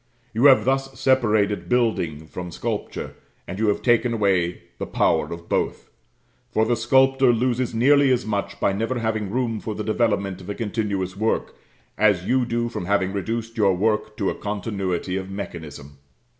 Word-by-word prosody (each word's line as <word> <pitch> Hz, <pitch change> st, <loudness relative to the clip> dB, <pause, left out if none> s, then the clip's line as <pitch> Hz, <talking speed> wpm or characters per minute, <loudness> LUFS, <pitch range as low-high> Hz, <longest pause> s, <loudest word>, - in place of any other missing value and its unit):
You 115 Hz, +5 st, +2 dB
have 130 Hz, -6 st, +7 dB
thus 135 Hz, 0 st, -1 dB
separated 110 Hz, -6 st, +2 dB
building 110 Hz, -11 st, 0 dB
from 90 Hz, +2 st, -7 dB
sculpture, -, -, -4 dB, 0.3 s
and 95 Hz, -, -6 dB
you 110 Hz, -, +1 dB
have 105 Hz, -, 0 dB
taken 120 Hz, -1 st, +3 dB
away 95 Hz, -5 st, +1 dB, 0.2 s
the -, -, -3 dB
power -, -, +1 dB
of 85 Hz, 0 st, -8 dB
both; -, -, -2 dB, 0.6 s
for 110 Hz, -, +1 dB
the 120 Hz, +2 st, +2 dB
sculptor 130 Hz, +3 st, +4 dB
loses 120 Hz, 0 st, 0 dB
nearly 140 Hz, +3 st, +5 dB
as 125 Hz, -2 st, +1 dB
much 100 Hz, -1 st, -3 dB
by 100 Hz, -, +2 dB
never 115 Hz, +5 st, -1 dB
having 110 Hz, -3 st, -1 dB
room 115 Hz, 0 st, -1 dB
for 110 Hz, 0 st, -5 dB
the 105 Hz, -, -4 dB
development 105 Hz, -4 st, 0 dB
of 90 Hz, -, -10 dB
a 100 Hz, -, -3 dB
continuous 100 Hz, -4 st, -2 dB
work, 110 Hz, +3 st, -1 dB, 0.4 s
as 100 Hz, -4 st, +3 dB
you 125 Hz, +1 st, +1 dB
do 120 Hz, 0 st, -1 dB
from 115 Hz, -6 st, -5 dB
having 95 Hz, -1 st, +1 dB
reduced 115 Hz, +4 st, -3 dB
your 100 Hz, -4 st, +3 dB
work 105 Hz, +2 st, 0 dB
to 100 Hz, -, 0 dB
a -, -, -3 dB
continuity 100 Hz, -3 st, -3 dB
of 95 Hz, 0 st, -5 dB
mechanism. 75 Hz, -7 st, -8 dB
110 Hz, 170 wpm, -23 LUFS, 95-120 Hz, 0.6 s, have